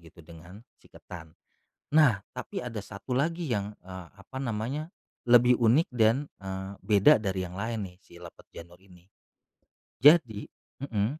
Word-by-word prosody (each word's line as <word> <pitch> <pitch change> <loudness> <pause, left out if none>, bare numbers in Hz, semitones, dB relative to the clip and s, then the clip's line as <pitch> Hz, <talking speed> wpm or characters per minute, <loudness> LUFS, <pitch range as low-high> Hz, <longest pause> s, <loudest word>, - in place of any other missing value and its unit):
gitu 85 +1 -17
dengan 85 +5 -14 0.2
si - - -23
ketan. 85 -3 -12 0.6
Nah, 145 -10 +4 0.2
tapi - - -5
ada 120 -3 -6
satu 100 +5 -11
lagi 165 +4 -1
yang, 105 -2 -2
eee, 95 -1 -9
apa 105 +6 -10
namanya, 130 +5 -3 0.4
lebih 120 0 +6
unik, 120 +8 +3
dan, 120 +5 +2
eee, 95 0 -6
beda 105 +9 +5
dari 95 -3 -2
yang 90 0 -9
lain 110 0 -3
nih, 90 - -21
si 85 - -21
lepet 85 - -13
janur 85 +1 -12
ini. 90 -2 -19 1.0
Jadi 145 -9 +5 0.3
mhm, 120 +1 -2
105 Hz, 150 wpm, -28 LUFS, 95-125 Hz, 1.0 s, lebih